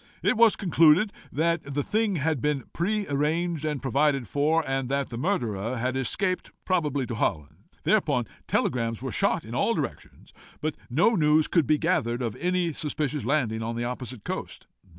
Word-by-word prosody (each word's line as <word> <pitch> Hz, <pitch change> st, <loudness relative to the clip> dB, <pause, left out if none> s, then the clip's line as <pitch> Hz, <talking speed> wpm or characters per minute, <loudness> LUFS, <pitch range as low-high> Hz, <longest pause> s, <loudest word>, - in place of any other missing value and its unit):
It -, -, +3 dB
was 230 Hz, -1 st, +5 dB
concluded 175 Hz, +1 st, +4 dB, 0.2 s
that 170 Hz, +3 st, +1 dB
the 145 Hz, -, +1 dB
thing 215 Hz, +1 st, 0 dB
had 155 Hz, -3 st, 0 dB
been 150 Hz, -3 st, 0 dB
pre 205 Hz, +4 st, -1 dB
arranged 155 Hz, +3 st, 0 dB
and 150 Hz, -3 st, -2 dB
provided 135 Hz, -1 st, +1 dB
for, 155 Hz, +2 st, +1 dB
and 135 Hz, -1 st, -1 dB
that 140 Hz, 0 st, -1 dB
the 120 Hz, -, -6 dB
murderer 120 Hz, -, -1 dB
had 130 Hz, +2 st, -1 dB
escaped, 185 Hz, -, 0 dB, 0.2 s
probably 150 Hz, -7 st, 0 dB
to 120 Hz, -, -5 dB
Holland. 75 Hz, -9 st, -3 dB, 0.2 s
Thereupon -, -, +2 dB, 0.2 s
telegrams 115 Hz, -2 st, 0 dB
were -, -, -3 dB
shot -, -, +1 dB
in -, -, -8 dB
all -, -, +1 dB
directions, -, -, -6 dB, 0.3 s
but 155 Hz, 0 st, -2 dB, 0.2 s
no 160 Hz, -, +4 dB
news 155 Hz, -6 st, +3 dB
could 165 Hz, -7 st, +2 dB
be 155 Hz, -, +4 dB
gathered 125 Hz, -8 st, 0 dB
of 115 Hz, -3 st, -2 dB
any 180 Hz, -1 st, 0 dB
suspicious 150 Hz, -3 st, -2 dB
landing 120 Hz, -5 st, 0 dB
on 115 Hz, +1 st, -3 dB
the 120 Hz, -, -2 dB
opposite 125 Hz, -2 st, -5 dB
coast. -, -, -5 dB
150 Hz, 170 wpm, -26 LUFS, 125-170 Hz, 0.3 s, was